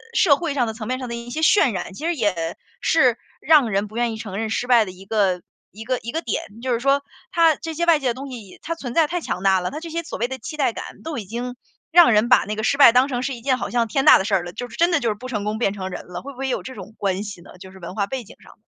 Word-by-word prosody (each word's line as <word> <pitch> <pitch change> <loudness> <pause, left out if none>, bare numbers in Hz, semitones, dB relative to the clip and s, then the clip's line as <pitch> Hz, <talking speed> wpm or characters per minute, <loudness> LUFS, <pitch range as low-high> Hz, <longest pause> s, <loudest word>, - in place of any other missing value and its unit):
社 315 -9 +5
会 335 -4 -2
上 250 -4 +2
的 220 - -3
层 220 -1 -7
面 255 0 -1
上 255 - -5
的 - - -4
一 235 +1 -8
些 310 +6 -4
渲 315 - +5
染， 190 - -5
其 195 - -10
实 345 - 0
也， 180 - -1 0.2
是， 255 -8 +3 0.3
让 295 -6 +5
人 200 +1 0
不 215 - -14
愿 240 -1 +1
意 - - -6
承 200 -3 -6
认 220 0 -2
失 230 - -1
败 235 -3 +5
的 185 - -7
一 185 +1 -14
个 195 -4 +1 0.3
一 215 +4 -9
个 255 +1 -1
一 235 - -6
个 325 - -2
点。 230 - -2 0.2
就 255 -2 0
是 230 - 0
说， 275 +2 +2 0.3
它 330 -2 +4
这 325 +1 -6
些 340 +2 0
外 330 -3 +5
界 265 - -2
的 240 - +2
东 270 +1 -7
西， 215 -7 -10
它 335 - -2
存 250 -7 -6
在 330 - +5
太 350 +2 -3
强 185 - -4
大 190 -1 +4
了。 180 - -3
它 300 - -5
这 330 0 -8
些 335 +1 -2
所 - - -6
谓 240 - +1
的 265 +1 -6
期 305 +6 -7
待 265 -5 +1
感， - - -9
都 320 -2 -4
已 215 - -5
经， 240 +5 -5 0.4
让 340 -6 +7
人 215 +2 +3
把 250 - +5
那 210 - -3
个 215 - -4
失 250 +5 +1
败 275 -4 +9
当 250 +3 +4
成 250 -2 -3
是 275 - -2
一 235 - -11
件 255 +1 +1
好 - - -4
像 235 -1 +1
天 270 +5 0
大 - - +9
的 - - -1
事 200 -2 +1
儿 180 - +1
了， 175 0 -8
就 245 +3 -6
是 235 - -11
真 340 +1 +3
的 330 - +3
就 235 - 0
是 210 - -1
不 250 +5 -9
成 210 -5 -2
功 215 +1 -2
便 200 -4 +1
成 190 -2 -5
仁 - - -7
了， 175 0 -7
会 280 - -8
不 - - -19
会 270 - -2
有 - - -1
这 260 - -8
种 200 +2 -10
关 195 0 -1
系 200 -4 -8
呢， - - -15
就 190 -1 -11
是 190 - -14
文 175 +1 -8
化 200 - 0
背 260 0 -4
景 - - -15
上。 - - -16
240 Hz, 360 characters per minute, -22 LUFS, 205-275 Hz, 0.4 s, 败